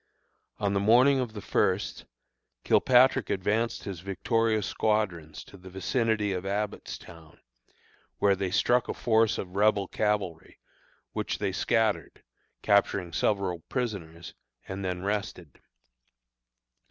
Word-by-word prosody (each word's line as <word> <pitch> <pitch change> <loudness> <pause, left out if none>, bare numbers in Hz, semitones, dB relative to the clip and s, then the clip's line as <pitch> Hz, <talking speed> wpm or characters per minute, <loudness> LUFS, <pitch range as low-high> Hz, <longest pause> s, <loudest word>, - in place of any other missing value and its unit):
On 100 -1 -1
the 100 - +1
morning 125 +7 +5
of 120 -4 -3
the 105 - -7
first, - - 0 0.6
Kilpatrick 130 +1 +4
advanced 105 +5 -1
his 95 -4 -6
victorious 110 +3 0
squadrons 90 -8 -1
to 100 - -15
the 95 0 -12
vicinity 105 +2 0
of 90 -1 -3
Abbottstown, 95 -5 -5 0.8
where 100 -1 +3
they 95 -1 -2
struck 120 +6 +2
a - - -2
force 110 -1 +2
of 90 0 -6
Rebel 100 -1 +3
cavalry, 100 -7 -2 0.5
which - - -3
they 95 - -1
scattered, 110 +2 0 0.4
capturing 100 -3 +2
several 95 -1 0
prisoners, 85 -10 -4 0.3
and 95 +1 -5
then 90 -1 -3
rested. 100 -7 -4
100 Hz, 115 wpm, -28 LUFS, 90-110 Hz, 0.8 s, morning